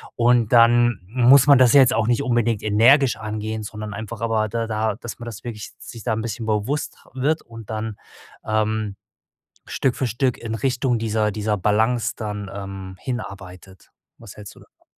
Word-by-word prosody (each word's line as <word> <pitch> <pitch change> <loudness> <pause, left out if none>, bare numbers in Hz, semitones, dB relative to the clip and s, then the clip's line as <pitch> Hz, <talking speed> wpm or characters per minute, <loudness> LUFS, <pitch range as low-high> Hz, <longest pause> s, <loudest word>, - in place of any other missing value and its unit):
Und 120 -2 +3
dann 120 0 +5
muss 125 +4 +5
man 140 -2 +7
das 125 0 +5
ja 140 - +8
jetzt 130 -1 +4
auch 115 -1 +1
nicht 120 +3 +1
unbedingt 120 -4 0
energisch 120 +4 +4
angehen, 110 0 -4
sondern 105 0 -7
einfach 110 +1 -7
aber 110 -2 0
da 115 +1 -2
da 110 -1 -1
dass 120 +1 -9
man 120 - -8
das 115 -1 -8
wirklich 115 -3 -7
sich 115 - -10
da 115 - 0
'n 110 - -2
bisschen 115 0 -5
bewusst 110 +8 -2 0.2
wird 145 +5 0
und 115 -2 -12
dann, 110 -1 -4 0.5
ähm, 110 -1 -1 0.7
Stück 130 -2 -1
für 130 - -1
Stück 125 +3 -1
in 110 -1 -5
Richtung 125 0 0
dieser 110 -1 0
dieser 105 0 -1
Balance 110 +4 +1
dann, 105 -2 -5
ähm, 95 -1 -7
hinarbeitet. 95 -7 -8 0.3
Was 115 -4 -13
hältst 105 -1 -11
du - - -16
davon? - - -24
110 Hz, 180 wpm, -22 LUFS, 105-120 Hz, 0.7 s, ja